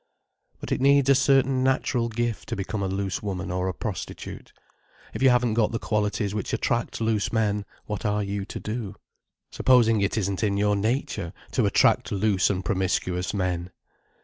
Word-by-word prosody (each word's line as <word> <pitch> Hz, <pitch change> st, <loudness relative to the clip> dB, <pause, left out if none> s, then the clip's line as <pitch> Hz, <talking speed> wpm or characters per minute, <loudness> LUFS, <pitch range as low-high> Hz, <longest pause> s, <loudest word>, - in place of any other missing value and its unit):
But -, -, -8 dB
it -, -, 0 dB
needs 140 Hz, 0 st, +5 dB
a -, -, +8 dB
certain 135 Hz, -1 st, +3 dB
natural 130 Hz, -2 st, +1 dB
gift 115 Hz, 0 st, -3 dB
to -, -, -2 dB
become 100 Hz, +1 st, -3 dB
a 95 Hz, -, 0 dB
loose 95 Hz, -1 st, -2 dB
woman 95 Hz, -3 st, -4 dB
or 90 Hz, +1 st, -1 dB
a 95 Hz, -, -1 dB
prostitute. 105 Hz, -1 st, -6 dB, 0.6 s
If -, -, -5 dB
you 135 Hz, -, +6 dB
haven't 125 Hz, -2 st, +3 dB
got 110 Hz, -1 st, +2 dB
the -, -, +1 dB
qualities 105 Hz, -2 st, -1 dB
which 105 Hz, -2 st, -3 dB
attract 115 Hz, +1 st, -1 dB
loose 110 Hz, -2 st, 0 dB
men, 105 Hz, -2 st, 0 dB, 0.2 s
what 105 Hz, -1 st, -4 dB
are 105 Hz, -1 st, 0 dB
you 100 Hz, 0 st, -3 dB
to -, -, -7 dB
do? 105 Hz, -2 st, -5 dB, 0.6 s
Supposing 115 Hz, -4 st, +4 dB
it 100 Hz, +3 st, 0 dB
isn't 100 Hz, -2 st, -1 dB
in 100 Hz, -2 st, +1 dB
your 105 Hz, 0 st, +2 dB
nature 110 Hz, -, -2 dB, 0.2 s
to -, -, +2 dB
attract -, -, +3 dB
loose 100 Hz, -1 st, +2 dB
and 95 Hz, -2 st, -2 dB
promiscuous 90 Hz, -2 st, -1 dB
men! 90 Hz, -3 st, -2 dB
105 Hz, 175 wpm, -25 LUFS, 100-115 Hz, 0.6 s, a